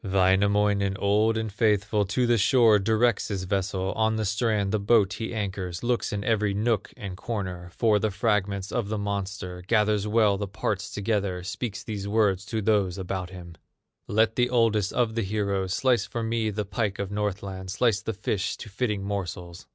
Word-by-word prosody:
Wainamoinen, 100 +1 +2
old 105 +3 +2
and 110 -2 -3
faithful, 105 -1 +2
To 125 +6 0
the 120 -1 +3
shore 110 0 +5
directs 110 +2 +2
his 100 -3 -3
vessel, 95 0 -1
On 110 0 +1
the 110 -1 -1
strand 105 -1 0
the 110 - +1
boat 105 -1 +3
he 110 - -4
anchors, 95 -5 -4
Looks 120 0 0
in 100 -1 -3
every 105 -3 +1
nook 110 0 0
and 95 -3 -6
corner 90 -4 -5
For 110 -3 +3
the 110 - 0
fragments 100 -1 -1
of 115 -5 -2
the 110 - -1
monster; 100 -3 -4
Gathers 105 -2 +2
well 105 -2 +3
the 100 - -2
parts 100 +1 -3
together, 100 -3 -1
Speaks 105 +2 -4
these 105 -2 -5
words 100 -2 +2
to 110 0 -2
those 100 -4 +2
about 95 -1 -4
him: 90 -2 -10 0.5
"Let 110 +1 +2
the 125 0 +3
oldest 115 -5 +2
of 120 -3 +1
the 115 - -1
heroes 100 -2 -1
Slice 120 -5 +2
for 115 +2 -4
me 115 -1 0
the 105 0 -3
pike 105 0 -2
of 100 -1 -4
Northland, 100 -2 -3
Slice 110 +1 +1
the 110 - -3
fish 100 0 -2
to 110 - -9
fitting 105 -1 -2
morsels." 90 -3 -5
105 Hz, 180 wpm, -26 LUFS, 95-110 Hz, 0.5 s, shore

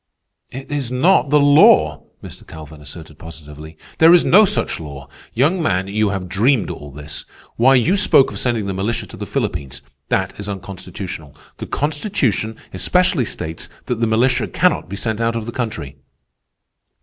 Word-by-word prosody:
"It 135 +3 -9
is 140 -4 -2
not 145 +4 +3
the 150 +1 +4
law!" 80 - +5 0.2
Mr. - - -12
Calvin 80 -1 -11
asserted 75 +1 -12
positively. 80 -1 -12 0.2
"There 165 +2 +8
is 175 - +3
no 210 +5 +6
such 205 +1 -1
law. 70 -4 -9 0.3
Young 155 +10 +2
man, 95 - 0
you 105 +1 0
have 95 -2 -4
dreamed 110 +5 +1
all 75 - -9
this. 75 +1 -8 0.3
Why, 130 +3 +4
you 125 - +3
spoke 185 -8 +4
of - - -7
sending 120 -4 -1
the 100 - -3
militia 100 +5 -2
to - - -12
the - - -6
Philippines. 70 0 -4 0.3
That 95 0 0
is 100 0 -5
unconstitutional. 90 -5 -8 0.2
The - - -7
Constitution 145 - -1 0.2
especially 180 -8 +1
states 80 -5 -5 0.2
that 120 -2 -3
the 115 - +1
militia 125 +3 +1
cannot - - 0
be 100 - -5
sent 110 +2 -3
out 115 0 0
of 115 -2 -3
the 120 - -5
country." 80 - -5
110 Hz, 170 wpm, -19 LUFS, 80-135 Hz, 0.3 s, There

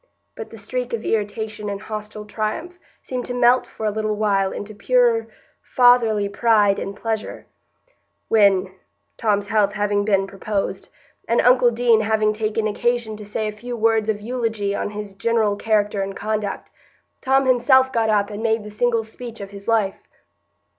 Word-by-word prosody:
But 220 - -8
the 225 - -11
streak 250 +4 -4
of 230 -1 -3
irritation 210 0 -2
and 200 -1 -4
hostile 210 0 -7
triumph 230 - -4 0.2
seemed 250 -1 -4
to 245 - -4
melt 245 +1 +4
for 220 - -7
a 210 - +1
little 215 0 -2
while 200 -2 +1
into 210 +1 -7
purer 475 - +2 0.3
fatherly 235 -5 +3
pride 205 -1 +3
and 200 - -5
pleasure, 220 0 -4 0.8
when, 200 -4 +3 0.5
Tom's 205 -2 0
health 210 -2 +2
having 205 -1 0
been 195 -2 +2
proposed, 195 +1 -4 0.4
and 230 - +2
uncle 250 0 +5
Deane 235 -1 +3
having 215 0 +1
taken 215 0 -1
occasion 230 +1 -1
to 210 - -9
say 215 +1 -2
a - - -2
few 240 +3 -7
words 225 -1 +2
of 210 -1 -1
eulogy 225 -3 -2
on 205 - -2
his 205 -1 -7
general 220 0 +1
character 210 -1 0
and 195 0 -4
conduct, 215 -2 -3 0.5
Tom 270 +1 +2
himself 260 +1 +4
got 225 -1 +1
up 205 -1 +1
and 205 +1 -6
made 225 -1 0
the 210 - -9
single 230 +1 +1
speech 230 +1 -10
of 200 -1 -8
his 200 0 -11
life. 215 -4 +1
215 Hz, 165 wpm, -21 LUFS, 205-235 Hz, 0.8 s, uncle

